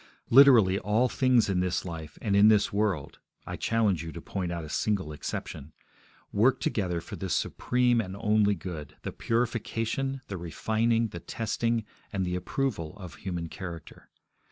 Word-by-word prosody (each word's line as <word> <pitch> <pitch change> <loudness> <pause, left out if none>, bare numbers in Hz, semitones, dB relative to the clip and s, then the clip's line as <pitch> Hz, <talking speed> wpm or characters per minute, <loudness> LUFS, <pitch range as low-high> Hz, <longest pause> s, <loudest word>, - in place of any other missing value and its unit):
Literally 115 -8 +7
all 110 +5 +2
things 130 -3 +3
in 95 -2 +1
this 90 0 -1
life 80 -3 -7
and 100 -2 +1
in 100 +1 +7
this 105 -2 +4
world 100 -9 -1 0.3
I - - -5
challenge 110 -7 +1
you 80 - -6
to 85 - -7
point 90 +1 -4
out 85 -1 -4
a 75 - -8
single 95 -3 -1
exception 75 0 -6 0.6
work 120 +5 +3
together 90 -5 -1
for - - -8
this 95 -4 -1
supreme 125 -1 +1
and 95 -2 -6
only 105 -1 +3
good, 80 -5 -7
the - - -4
purification, 115 +3 -1
the 95 - -5
refining, 115 +7 0
the 85 - -7
testing, 115 +2 -1 0.3
and 95 -2 -1
the 90 0 -2
approval 90 - -2
of 90 -5 -9
human 85 -3 -4
character. 85 -2 -9
100 Hz, 160 wpm, -28 LUFS, 85-115 Hz, 0.6 s, Literally